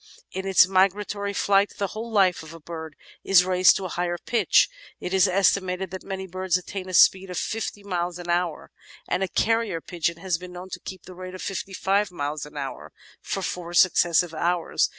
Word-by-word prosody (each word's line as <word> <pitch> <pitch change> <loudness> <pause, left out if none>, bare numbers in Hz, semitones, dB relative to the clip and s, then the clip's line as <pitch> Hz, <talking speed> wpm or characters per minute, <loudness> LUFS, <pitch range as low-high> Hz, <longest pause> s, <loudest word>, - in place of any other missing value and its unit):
In 190 +1 -4
its 190 -1 +6
migratory 200 +2 +1
flight 200 0 +2
the 200 -2 -1
whole 225 +2 -6
life 195 -5 +3
of 160 +1 -11
a - - -11
bird 160 -1 -8 0.3
is 185 -2 +5
raised 185 0 +5
to 195 - -3
a - - -4
higher 175 0 -2
pitch. 235 +6 +3 0.3
It 180 - -5
is 190 +1 +5
estimated 185 -1 +1
that 190 - -6
many 190 -1 -5
birds 185 0 0
attain 185 +1 -7
a - - -7
speed 190 +2 +5
of 180 - -5
fifty 215 -2 -3
miles 175 -3 -2
an 175 -1 -9
hour, 175 -1 -1 0.4
and 180 - -1
a 190 - +1
carrier 225 -4 0
pigeon 170 0 -2
has 175 -1 -2
been 180 0 -10
known 180 +1 -9
to - - -5
keep 185 -2 -9
up - - -22
the 185 - -10
rate 185 +1 -8
of 185 - -8
fifty 195 0 -4
five 195 +2 +1
miles 150 -2 -4
an 150 0 -12
hour 135 -3 -6 0.3
for 195 - -3
four 175 -1 -4
successive 175 -1 +4
hours. 170 +2 0
185 Hz, 210 wpm, -25 LUFS, 175-195 Hz, 0.4 s, its